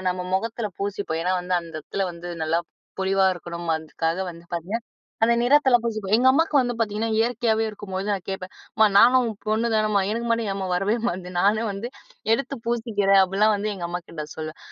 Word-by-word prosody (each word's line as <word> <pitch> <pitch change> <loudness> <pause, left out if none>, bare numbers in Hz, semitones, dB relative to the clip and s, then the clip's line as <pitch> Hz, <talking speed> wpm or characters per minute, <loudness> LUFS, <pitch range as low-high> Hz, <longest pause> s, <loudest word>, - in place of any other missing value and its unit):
நம்ம 180 0 -3
முகத்தில 225 +1 -2
பூசிப்போம். 200 -5 -2
ஏன்னா, 185 - +2
வந்து 180 +1 -5
அந்த 165 -1 -11
இடத்தில 190 +5 -3
வந்து 170 +1 -9 0.2
நல்லா 165 +2 +1 0.4
பொலிவா 190 0 +3
இருக்கணும். 170 0 -7
அதுக்காக 165 +2 -2
வந்து 170 0 -14
பார்த்தீங்கன்னா, 195 +8 -3 0.4
அந்த 235 +1 +4
நிறத்தில 265 0 +5
பூசிப்போம். 215 -4 -3
எங்க 250 - +2
அம்மாக்கு 315 +2 +2
வந்து 245 -2 +1
பார்த்தீங்கன்னா 220 0 -1
இயற்கையாவே 225 -1 +1
இருக்கும்போது, 200 -2 -5
நான் 195 -3 -1
கேட்பேன். 190 -1 -5 0.2
"அம்மா 220 0 +5
நானும் 250 +3 +7
உன் 220 - -3
பொண்ணு 220 +2 +1
தானம்மா? 215 -2 +2
எனக்கு 235 +2 -2
மட்டும் 230 -2 +1
ஏம்மா 195 -1 -3
வரவே 195 +4 +1
மாட்டேங்குது? 180 -1 -3
நானே 215 +3 +3
வந்து 200 +4 -5 0.4
எடுத்து 270 +4 0
பூசிக்கிறேன்." 210 -5 +3
அப்படிலாம் 200 +3 +3
வந்து 210 +1 -2
எங்க 175 -3 -6
அம்மாகிட்ட 170 -3 -6
சொல்லுவேன். 155 0 -6
205 Hz, 180 wpm, -24 LUFS, 180-230 Hz, 0.4 s, நானும்